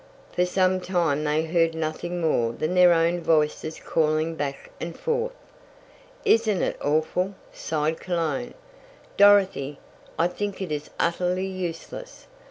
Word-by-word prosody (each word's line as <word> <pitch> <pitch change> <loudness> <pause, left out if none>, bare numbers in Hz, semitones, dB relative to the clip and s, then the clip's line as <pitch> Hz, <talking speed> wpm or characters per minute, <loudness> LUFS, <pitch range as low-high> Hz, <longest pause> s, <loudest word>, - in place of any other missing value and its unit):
For 180 0 +1
some 185 0 +2
time 170 -5 0
they 150 +1 +1
heard 165 0 +2
nothing 160 +2 -3
more 120 -8 +1
than 155 +8 -2
their 180 -1 +7
own 170 +1 +2
voices 155 -1 +1
calling 155 0 +1
back 145 -3 -5
and 165 0 -5
forth. 480 +1 -1 0.9
"Isn't 220 -4 +3
it - - -2
awful?" 160 +6 0 0.2
sighed 155 0 -2
Cologne. 180 +7 -2 0.6
"Dorothy, 195 -9 +4 0.4
I 170 - +3
think 200 +2 -4
it 190 -5 -4
is 150 0 -4
utterly 180 +2 0
useless. 190 - -6
170 Hz, 130 wpm, -25 LUFS, 155-185 Hz, 0.9 s, their